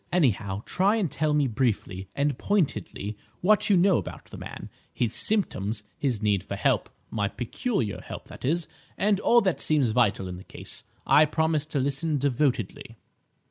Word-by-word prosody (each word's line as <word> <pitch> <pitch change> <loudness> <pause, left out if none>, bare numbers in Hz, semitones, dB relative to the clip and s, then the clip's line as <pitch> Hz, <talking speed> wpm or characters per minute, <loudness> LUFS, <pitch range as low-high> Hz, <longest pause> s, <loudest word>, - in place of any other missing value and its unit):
Anyhow, 110 - +1
try 195 +4 +2
and 200 -9 0
tell 155 +1 0
me 145 -1 +3
briefly 105 -6 -1
and 145 -1 +1
pointedly 110 - -1 0.3
what 210 +4 +4
you 200 - +6
know 185 0 +4
about - - -8
the - - -11
man, - - -8 0.2
his 120 -2 -1
symptoms, 110 - +1
his 130 -9 -1
need 100 -3 +2
for - - -5
help, - - +1 0.2
my 105 -2 0
peculiar 120 - -2
help, - - -8
that - - -12
is, 165 +5 0 0.3
and 200 0 +2
all 235 +3 +5
that 190 -5 0
seems 145 -7 +2
vital 110 -5 +2
in 90 -1 -6
the 90 - -10
case. - - -7 0.2
I 155 - +6
promise 155 0 0
to 150 -2 -1
listen 140 +3 0
devotedly." 130 -5 -1
140 Hz, 170 wpm, -27 LUFS, 110-170 Hz, 0.3 s, you